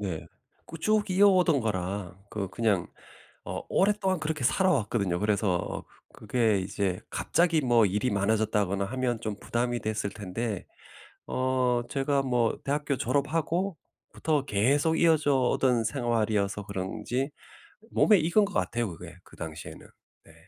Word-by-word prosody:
네. 95 Hz, -6 st, -4 dB, 0.4 s
그 165 Hz, -, -9 dB
쭉 215 Hz, +3 st, +1 dB
이어오던 185 Hz, -6 st, +4 dB
거라 95 Hz, -3 st, -3 dB
그 100 Hz, -3 st, -3 dB
그냥 105 Hz, -5 st, 0 dB, 0.6 s
어 -, -, -5 dB
오랫동안 190 Hz, -2 st, +2 dB
그렇게 155 Hz, -3 st, -3 dB
살아왔거든요. 115 Hz, -, +1 dB
그래서 100 Hz, -4 st, 0 dB, 0.3 s
그게 110 Hz, -2 st, +1 dB
이제 95 Hz, -1 st, -2 dB
갑자기 170 Hz, -2 st, +1 dB
뭐 120 Hz, -4 st, +4 dB
일이 105 Hz, +6 st, 0 dB
많아졌다거나 100 Hz, -1 st, +1 dB
하면 125 Hz, +1 st, -1 dB
좀 110 Hz, -3 st, -3 dB
부담이 120 Hz, 0 st, -1 dB
됐을 110 Hz, -1 st, -2 dB
텐데 105 Hz, +1 st, -4 dB, 0.6 s
어 130 Hz, -1 st, +1 dB
제가 140 Hz, 0 st, 0 dB
뭐 120 Hz, -4 st, +1 dB
대학교 145 Hz, 0 st, -1 dB
졸업하고부터 155 Hz, -, -2 dB
계속 140 Hz, +10 st, +2 dB
이어져 155 Hz, -4 st, +4 dB
오던 125 Hz, -2 st, +2 dB
생활이어서 110 Hz, -5 st, 0 dB
그런지 105 Hz, +8 st, -3 dB, 0.6 s
몸에 210 Hz, -3 st, +5 dB
익은 170 Hz, +7 st, +3 dB
것 200 Hz, -, -9 dB
같아요 120 Hz, -2 st, 0 dB
그게 -, -, -10 dB
그 -, -, -17 dB
당시에는. 80 Hz, -3 st, -8 dB, 0.4 s
네. -, -, -18 dB
120 Hz, 290 characters per minute, -28 LUFS, 105-150 Hz, 0.6 s, 몸에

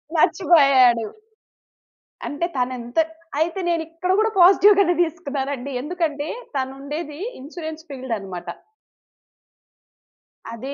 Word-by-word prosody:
మర్చిపోయాడు. 275 Hz, -, +4 dB, 1.2 s
అంటే 295 Hz, +4 st, -2 dB
తనెంత 250 Hz, 0 st, -3 dB, 0.4 s
అయితే 335 Hz, +4 st, 0 dB
నేనిక్కడ 330 Hz, +1 st, -2 dB
గూడా 440 Hz, +1 st, +3 dB
పాజిటివ్ 390 Hz, +3 st, +7 dB
గానే 355 Hz, -3 st, +4 dB
దీసుకున్నానండి. 280 Hz, -5 st, -3 dB
ఎందుకంటే 305 Hz, -2 st, -2 dB, 0.3 s
తను 265 Hz, 0 st, -2 dB
ఉండేది 295 Hz, +1 st, -6 dB, 0.2 s
ఇన్స్యూరెన్స్ 315 Hz, +2 st, -8 dB
ఫీల్డ్ 260 Hz, -3 st, -4 dB
అన్నమాట. 180 Hz, -3 st, -8 dB, 2.1 s
అది 260 Hz, +5 st, -6 dB
295 Hz, 90 wpm, -22 LUFS, 260-340 Hz, 2.1 s, పాజిటివ్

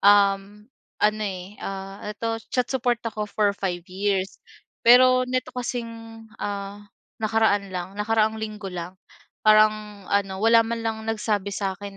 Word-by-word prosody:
um, 200 Hz, 0 st, +4 dB, 0.3 s
ano, 215 Hz, +1 st, +2 dB
eh, 190 Hz, 0 st, -6 dB
ah, 195 Hz, 0 st, -6 dB
eto 225 Hz, +2 st, -3 dB
chat 250 Hz, -1 st, +1 dB
support 245 Hz, -2 st, +1 dB
ako 215 Hz, -2 st, -3 dB
for 205 Hz, -1 st, +1 dB
5 180 Hz, -3 st, -3 dB
years. 195 Hz, +1 st, -2 dB, 0.4 s
Pero 255 Hz, +1 st, +6 dB
neto 255 Hz, 0 st, -2 dB
kasing, 245 Hz, -2 st, -3 dB, 0.5 s
ah, 200 Hz, 0 st, -4 dB, 0.4 s
nakaraan 215 Hz, -2 st, +2 dB
lang, 185 Hz, 0 st, -5 dB
nakaraang 220 Hz, 0 st, +1 dB
linggo 210 Hz, -3 st, -5 dB
lang 180 Hz, +1 st, -6 dB, 0.5 s
parang 215 Hz, -1 st, +4 dB
ano, 195 Hz, -1 st, 0 dB
wala 230 Hz, +1 st, +6 dB
man 230 Hz, +1 st, -3 dB
lang 225 Hz, -1 st, -1 dB
nagsabi 210 Hz, -2 st, -1 dB
sa 195 Hz, -1 st, -1 dB
akin 200 Hz, 0 st, -9 dB
210 Hz, 140 wpm, -24 LUFS, 195-225 Hz, 0.5 s, Pero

